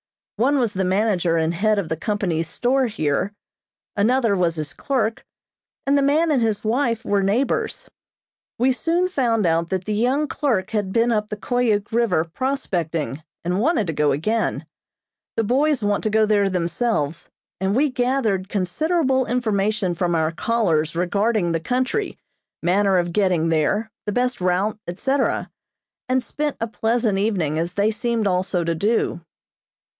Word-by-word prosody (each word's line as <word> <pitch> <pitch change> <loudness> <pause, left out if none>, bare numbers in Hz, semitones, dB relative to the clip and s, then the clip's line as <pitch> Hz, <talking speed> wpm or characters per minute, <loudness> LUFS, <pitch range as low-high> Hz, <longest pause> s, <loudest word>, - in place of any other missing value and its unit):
One 270 +6 +3
was 235 -5 0
the 190 - -1
manager 185 -3 +1
and 160 +1 +1
head 215 +4 +1
of 200 -5 -1
the 160 - -2
company's 170 -3 -2
store 260 +1 +1
here, 155 -2 -1 0.6
another 225 +1 +2
was 175 -3 +1
his 150 -3 -4
clerk, 230 -5 -1 0.6
and 275 +1 +3
the 280 - +4
man 305 +4 +3
and 270 -5 +2
his 220 -3 0
wife 230 0 0
were 200 -1 +2
neighbors. 215 +8 0 0.7
We 255 +3 +3
soon 335 +7 +1
found 235 - +1
out 165 0 +1
that 190 -1 -2
the 215 - -2
young 255 +8 +1
clerk 230 -13 -1
had 205 -4 -1
been 230 +3 +2
up 210 -1 0
the 210 - -4
Koyuk 220 -3 0
River 220 -8 +2
prospecting, 170 - -2 0.2
and 180 +2 0
wanted 240 -2 +2
to 165 - -3
go 150 -1 +2
again. 215 +12 -1 0.7
The 225 - +2
boys 270 +3 +1
want 205 0 0
to - - +2
go 215 +1 +3
there 205 -2 +2
themselves, 170 -2 -1 0.3
and 190 +2 0
we 285 +2 +2
gathered 245 -7 0
considerable 265 - 0
information 215 -5 0
from 175 0 0
our 160 -1 +1
callers 165 -5 0
regarding 200 +2 +1
the 165 - 0
country, 255 - -1 0.5
manner 190 +2 +3
of 175 -1 0
getting 180 -5 +2
there, 200 +8 +1 0.2
the - - +1
best 250 0 0
route, 185 +4 0
etc., 265 +10 -1 0.6
and 255 0 +2
spent 295 +3 -3
a 230 - 0
pleasant 225 -2 0
evening, 180 -8 0
as 170 +2 -3
they 205 +2 +2
seemed 230 0 -1
also 185 -1 0
to 165 0 0
do. 200 0 0
210 Hz, 160 wpm, -22 LUFS, 180-245 Hz, 0.7 s, the